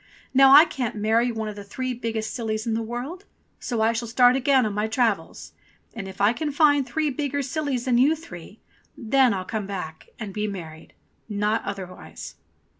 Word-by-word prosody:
Now 270 Hz, 0 st, +7 dB
I 300 Hz, +4 st, +10 dB
can't 250 Hz, -8 st, -4 dB
marry 225 Hz, +3 st, +2 dB
one 220 Hz, -1 st, -4 dB
of 210 Hz, -, -6 dB
the 205 Hz, -, -8 dB
three 255 Hz, +5 st, -4 dB
biggest 225 Hz, -2 st, -4 dB
sillies 220 Hz, -2 st, -3 dB
in 230 Hz, -, -1 dB
the 225 Hz, -, -1 dB
world. 250 Hz, -, -6 dB, 0.3 s
So 235 Hz, -3 st, -2 dB
I 225 Hz, +1 st, +3 dB
shall 235 Hz, +1 st, -3 dB
start 245 Hz, +2 st, +5 dB
again 265 Hz, -1 st, +3 dB
on 210 Hz, -, -2 dB
my 210 Hz, +1 st, -1 dB
travels, 220 Hz, -7 st, -1 dB, 0.4 s
and 215 Hz, -4 st, -6 dB
if 190 Hz, -, -10 dB
I 205 Hz, +3 st, +4 dB
can 300 Hz, +3 st, -3 dB
find 290 Hz, -2 st, +3 dB
three 305 Hz, +4 st, -1 dB
bigger 285 Hz, +1 st, -2 dB
sillies 275 Hz, -3 st, -2 dB
than 245 Hz, -2 st, +2 dB
you 290 Hz, +5 st, +4 dB
three, 200 Hz, -, -12 dB, 0.4 s
then 260 Hz, +2 st, +3 dB
I'm 190 Hz, -3 st, -3 dB
come 210 Hz, 0 st, -4 dB
back 180 Hz, -5 st, -7 dB
and 210 Hz, -4 st, -7 dB
be 210 Hz, +1 st, -2 dB
married 165 Hz, -5 st, -8 dB, 0.3 s
— -, -, -42 dB, 0.2 s
not 220 Hz, +2 st, +1 dB
otherwise." 190 Hz, -2 st, -7 dB
230 Hz, 195 wpm, -24 LUFS, 210-265 Hz, 0.4 s, I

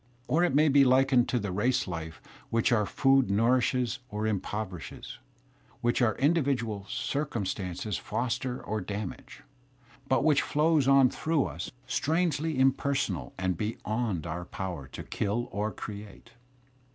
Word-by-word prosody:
Or 165 Hz, +4 st, +3 dB
it 175 Hz, -6 st, +2 dB
may 155 Hz, +2 st, +5 dB
be 140 Hz, -1 st, +6 dB
likened 130 Hz, -1 st, +4 dB
to 125 Hz, -, +1 dB
the 105 Hz, -4 st, -2 dB
race 120 Hz, +7 st, +1 dB
life 80 Hz, -2 st, -6 dB, 0.3 s
which 115 Hz, +2 st, +2 dB
our 105 Hz, -4 st, +3 dB
food 135 Hz, -3 st, +3 dB
nourishes 120 Hz, +3 st, +2 dB
or 105 Hz, +1 st, -3 dB
im 105 Hz, -3 st, +1 dB
poverishes, 95 Hz, -5 st, -6 dB, 0.6 s
which 120 Hz, +2 st, +1 dB
our 110 Hz, -3 st, +3 dB
individual 130 Hz, -10 st, 0 dB
drciunstances 105 Hz, -, -2 dB
foster 125 Hz, +1 st, -2 dB
or 110 Hz, +1 st, -2 dB
damage, 100 Hz, +1 st, -6 dB, 0.6 s
but 130 Hz, -, +2 dB
which 150 Hz, -2 st, +4 dB
flows 150 Hz, -2 st, +2 dB
on 135 Hz, -2 st, +6 dB
through 160 Hz, -3 st, 0 dB
us, 80 Hz, +4 st, -5 dB, 0.2 s
strangely 160 Hz, 0 st, 0 dB
impersonal 140 Hz, +1 st, +1 dB
and 95 Hz, -2 st, -1 dB
beyond 110 Hz, -3 st, -2 dB
our 85 Hz, +2 st, -4 dB
power 85 Hz, -9 st, -5 dB
to -, -, -8 dB
kill 115 Hz, +4 st, -2 dB
or 105 Hz, +1 st, -1 dB
create. 105 Hz, +2 st, -9 dB
120 Hz, 140 wpm, -29 LUFS, 100-135 Hz, 0.6 s, be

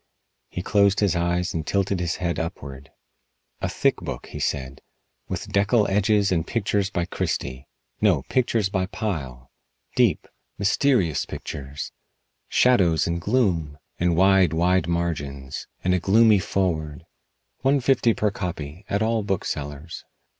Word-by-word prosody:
He 90 Hz, -, -5 dB
closed 100 Hz, 0 st, +3 dB
his 100 Hz, -4 st, +2 dB
eyes 85 Hz, +1 st, 0 dB
and 80 Hz, -, -2 dB
tilted 100 Hz, +3 st, 0 dB
his 85 Hz, -1 st, -1 dB
head 85 Hz, -2 st, -2 dB
upward. 70 Hz, -4 st, -6 dB, 0.7 s
"A -, -, -1 dB
thick -, -, +1 dB
book," -, -, -6 dB
he -, -, -8 dB
said, 70 Hz, -1 st, -3 dB, 0.5 s
"with -, -, -5 dB
deckel 100 Hz, +2 st, +3 dB
edges 105 Hz, 0 st, +2 dB
and 85 Hz, -2 st, 0 dB
pictures 100 Hz, -3 st, 0 dB
by 85 Hz, -4 st, -1 dB
Christy. 65 Hz, -5 st, -3 dB, 0.3 s
No, 95 Hz, -10 st, +3 dB
pictures 115 Hz, -, +1 dB
by 95 Hz, -1 st, -1 dB
Pyle. 70 Hz, -, -5 dB, 0.4 s
Deep, -, -, +2 dB, 0.3 s
mysterious 100 Hz, -, +2 dB
pictures! 70 Hz, +1 st, -6 dB, 0.6 s
Shadows 90 Hz, -11 st, +4 dB
and 85 Hz, 0 st, -2 dB
gloom! 85 Hz, -, 0 dB, 0.2 s
And 85 Hz, -1 st, +2 dB
wide, 95 Hz, -1 st, +4 dB
wide 90 Hz, +2 st, +2 dB
margins. 70 Hz, -6 st, -3 dB, 0.2 s
And 90 Hz, -, +2 dB
a 90 Hz, -, +2 dB
gloomy 105 Hz, +3 st, +5 dB
foreword. 80 Hz, -6 st, -2 dB, 0.5 s
One 135 Hz, +2 st, +3 dB
fifty 125 Hz, -3 st, +3 dB
per 105 Hz, -1 st, +1 dB
copy, 90 Hz, -2 st, -6 dB
at 100 Hz, +2 st, +1 dB
all 115 Hz, 0 st, +1 dB
booksellers." 80 Hz, -6 st, -4 dB
90 Hz, 135 wpm, -24 LUFS, 80-100 Hz, 0.7 s, gloomy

